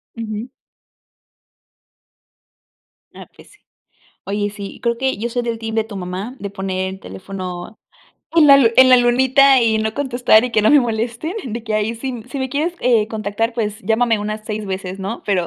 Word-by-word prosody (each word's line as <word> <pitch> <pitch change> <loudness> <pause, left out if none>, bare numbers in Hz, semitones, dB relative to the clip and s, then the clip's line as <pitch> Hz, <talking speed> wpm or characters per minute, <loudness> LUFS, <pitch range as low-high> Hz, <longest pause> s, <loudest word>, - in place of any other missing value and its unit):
Ujú. 220 0 -5 2.7
Ah, - - -11
pues - - -18
sí, 415 - -22 0.7
oye 205 +1 -2
sí 200 -1 -9
creo 235 -1 0
que 265 +1 -1
yo 230 +4 -3
soy 245 +1 -2
del 235 -1 -3
team 225 -1 -5
de 220 - +2
tu 215 -2 -9
mamá, 190 +7 -5
de 200 - -5
poner 190 -1 -3
el 190 0 -9
teléfono 180 - -8 0.6
en 325 -3 +6
la 280 -1 +9
lu 265 -4 +5
en 260 0 +8
la 255 - +8
lunita 260 +2 +4
y 225 -2 +2
no 220 0 -2
contestar 245 -4 +3
y 250 - -4
que 215 - +2
no 215 - +4
me 295 -1 +6
molesten, 235 +6 -3
de 235 -2 -5
que 220 -2 -3
ahí 215 +2 0
si 245 -1 -5
si 275 - -5
me 260 0 -2
quieres 305 +6 -2 0.4
contactar 220 +1 -2
pues 215 -2 -3
llámame 225 0 +1
unas 215 +1 -4
6 215 0 -4
veces, 190 -1 -5
¿no?, 195 +4 -5
pero 185 -4 +1
225 Hz, 185 wpm, -19 LUFS, 205-245 Hz, 2.7 s, la